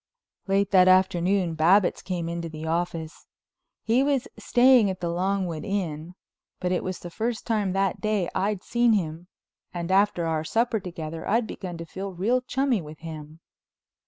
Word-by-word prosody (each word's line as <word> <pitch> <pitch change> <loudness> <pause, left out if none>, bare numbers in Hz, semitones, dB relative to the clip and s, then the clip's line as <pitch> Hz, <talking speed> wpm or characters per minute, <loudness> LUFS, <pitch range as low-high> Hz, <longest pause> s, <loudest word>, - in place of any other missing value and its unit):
Late 195 +1 +1
that 185 -2 +6
afternoon 185 -1 +3
Babbitts 175 +5 +3
came 175 -3 -3
into 170 0 -4
the 155 0 -7
office. 165 -1 -3 0.6
He 230 +3 +3
was 275 -2 +1
staying 245 -4 +4
at 185 -1 -4
the 170 -1 -2
Longwood 180 -2 -1
Inn, 180 -5 -3 0.4
but 180 -1 -1
it 180 - 0
was 185 -1 -3
the 175 - -9
first 225 +4 -3
time 210 -5 0
that 195 -1 0
day 215 -4 0
I'd 195 0 -1
seen 240 -1 +2
him 170 -3 -2 0.4
and 175 0 -4
after 195 -3 +3
our 160 -1 -1
supper 225 +6 0
together 165 -3 -6
I'd 225 +3 +2
begun 180 -5 -7
to 165 - -7
feel 190 +3 -6
real 225 +8 +1
chummy 260 -4 0
with 155 0 -10
him. 155 -1 -9
185 Hz, 165 wpm, -25 LUFS, 170-210 Hz, 0.6 s, that